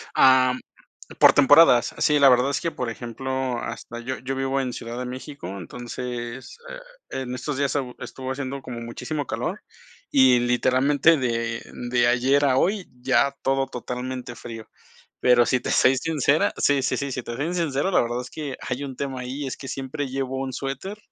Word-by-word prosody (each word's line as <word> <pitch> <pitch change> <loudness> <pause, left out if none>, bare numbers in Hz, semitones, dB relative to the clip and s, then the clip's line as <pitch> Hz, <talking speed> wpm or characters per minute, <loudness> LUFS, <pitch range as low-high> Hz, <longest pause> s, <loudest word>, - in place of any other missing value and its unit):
Am, 130 -1 +5 0.6
por - - +8
temporadas. 145 -4 +6
Sí, 150 -1 +3
la 140 -1 +7
verdad 125 +2 +4
es 140 - -1
que, 170 - -1
por 125 -5 -4
ejemplo, 130 +2 -3
hasta 120 +1 -6
yo 130 +2 -4
yo 135 +1 -3
vivo 135 +1 0
en 125 -2 -2
Ciudad 120 +1 -6
de 125 - -3
México, 130 -1 -7
entonces, 120 - -6 0.5
eh, - - -3
en 125 -1 -5
estos 135 +2 -4
días 140 0 0
e 140 - +1 0.2
estuvo 130 0 -6
haciendo 135 0 -5
como 120 -2 -7
muchísimo 140 +6 -4
calor - - -3 0.5
y, 130 -2 +6
literalmente, 130 +6 +3
de 115 -2 -2 0.3
de 120 -1 +3
ayer 130 +4 +3
a 130 -1 +3
hoy, 195 +5 +1
ya 135 +1 +3
todo 135 0 +1
totalmente 125 0 -5
frío. 115 -1 -9 0.5
Pero 120 -2 +5
si 125 0 +1
te - - -4
soy 130 +1 +4
sincera 155 +5 +1
sí, 140 -2 +3
sí, - - 0
sí, 140 -1 -3
si 125 - -3
te 120 0 -6
soy 155 +7 -2
sincero, 165 0 0
la - - +4
verdad 120 +1 -2
es 125 - -11
que 145 -4 -5
hay 125 +2 -3
un 135 -2 -7
tema 135 -2 -4
ahí, 135 +3 -5
es 130 - -4
que 135 - -9
siempre 135 +1 -4
llevo 135 0 -3
un 130 -1 -4
suéter 140 +12 -5
130 Hz, 190 wpm, -24 LUFS, 125-140 Hz, 0.6 s, por